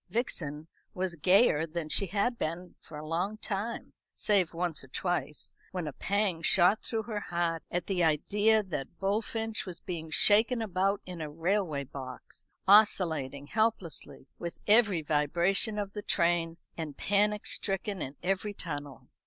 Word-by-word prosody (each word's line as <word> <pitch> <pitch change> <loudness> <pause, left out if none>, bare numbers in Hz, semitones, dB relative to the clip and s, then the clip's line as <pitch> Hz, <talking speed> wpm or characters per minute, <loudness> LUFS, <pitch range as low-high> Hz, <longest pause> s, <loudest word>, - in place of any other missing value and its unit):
Vixen 160 - -2 0.3
was 185 -1 -1
gayer 170 -1 +4
than 165 0 -4
she 195 +5 +2
had 210 +6 0
been 170 +3 -3
for 155 - -11
a 150 - -7
long 180 +6 -1
time, 215 +2 -4 0.2
save 195 -5 +2
once 170 -3 -2
or - - -13
twice, 175 +1 -2 0.2
when 180 -4 -3
a 150 - -4
pang 195 +1 0
shot 180 +4 +4
through 225 -1 -2
her 215 -2 -3
heart 170 -3 -1
at 175 -1 -2
the 185 -3 0
idea 205 +8 +3
that 170 -4 -5
Bullfinch 220 +3 -1
was 175 -2 -6
being 165 -4 -5
shaken 220 +8 +4
about 195 -2 0
in 180 -2 -7
a 155 - -4
railway 165 -2 0
box, 130 -1 -9 0.2
oscillating 160 -9 +4
helplessly 175 -9 -1
with 170 -1 -5
every 205 -6 +4
vibration 170 +9 +1
of 200 -1 -3
the 210 - -4
train, 170 -3 +1 0.2
and 155 -4 -5
panic 210 +1 +1
stricken 195 -1 -1
in 135 0 -5
every 195 +2 -1
tunnel. 145 -7 -6
180 Hz, 155 wpm, -30 LUFS, 160-205 Hz, 0.3 s, gayer